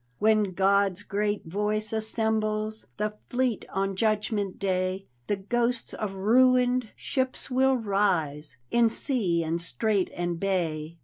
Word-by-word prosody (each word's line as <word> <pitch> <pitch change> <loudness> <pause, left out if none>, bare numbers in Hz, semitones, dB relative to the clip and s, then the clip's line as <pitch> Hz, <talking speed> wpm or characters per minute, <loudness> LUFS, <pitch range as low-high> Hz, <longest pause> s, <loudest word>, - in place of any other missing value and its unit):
When 215 -3 +2
God's 195 +1 +2
great 205 0 -1
voice 210 +5 -1
assembles 220 -1 -1
The 210 0 -1 0.2
fleet 245 -3 0
on 195 0 -1
Judgment 210 -1 0
Day, 185 0 -1 0.2
The 205 - +1
ghosts 235 +4 -1
of 205 -3 -4
ruined 250 +3 +3
shit>s 260 0 -2
will 265 +1 +3
rise 175 - 0
In 235 -1 +4
sea 215 - +1
and 165 +1 -1
strait 190 - 0
and 175 -1 -2
bay. 165 -4 -1
210 Hz, 125 wpm, -27 LUFS, 185-220 Hz, 0.2 s, In